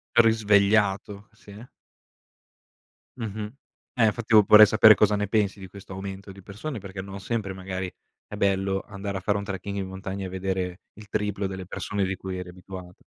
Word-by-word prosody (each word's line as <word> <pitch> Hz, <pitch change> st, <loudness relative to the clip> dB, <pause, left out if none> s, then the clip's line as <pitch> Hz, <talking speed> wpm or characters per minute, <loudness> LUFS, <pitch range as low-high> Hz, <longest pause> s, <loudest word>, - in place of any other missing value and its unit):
Risvegliato, 105 Hz, -2 st, +3 dB
sì. 105 Hz, +1 st, -13 dB, 1.5 s
Mh-mh. 110 Hz, -2 st, -5 dB, 0.4 s
Eh, 115 Hz, -4 st, +4 dB
fatti 115 Hz, +1 st, -4 dB
io 105 Hz, -1 st, +9 dB
porrei 105 Hz, +1 st, +9 dB
sapere 110 Hz, 0 st, +7 dB
cosa 105 Hz, 0 st, +3 dB
ne 105 Hz, 0 st, -1 dB
pensi 100 Hz, -1 st, 0 dB
di 95 Hz, -, -8 dB
questo 95 Hz, 0 st, -11 dB
aumento 95 Hz, +1 st, -7 dB
di 95 Hz, -, -13 dB
persone, 110 Hz, +8 st, -6 dB
perché 95 Hz, -1 st, -7 dB
non 100 Hz, +1 st, -8 dB
sempre, 100 Hz, -1 st, -3 dB
magari, 95 Hz, -1 st, -5 dB, 0.4 s
è -, -, -7 dB
bello 95 Hz, 0 st, +1 dB
andare 100 Hz, -1 st, -5 dB
a -, -, -3 dB
fare 100 Hz, +1 st, +1 dB
un 100 Hz, -, -4 dB
trekking 100 Hz, 0 st, -5 dB
in 95 Hz, -1 st, -3 dB
montagna 95 Hz, +1 st, -5 dB
e -, -, -5 dB
vedere 95 Hz, -1 st, -3 dB
il 105 Hz, 0 st, -13 dB
triplo 105 Hz, -1 st, -2 dB
delle 95 Hz, -1 st, -5 dB
persone 100 Hz, +1 st, -3 dB
di 95 Hz, +1 st, -2 dB
cui 95 Hz, 0 st, -6 dB
eri 90 Hz, -1 st, -7 dB
abituata. 90 Hz, 0 st, -11 dB
100 Hz, 180 wpm, -26 LUFS, 95-105 Hz, 1.5 s, io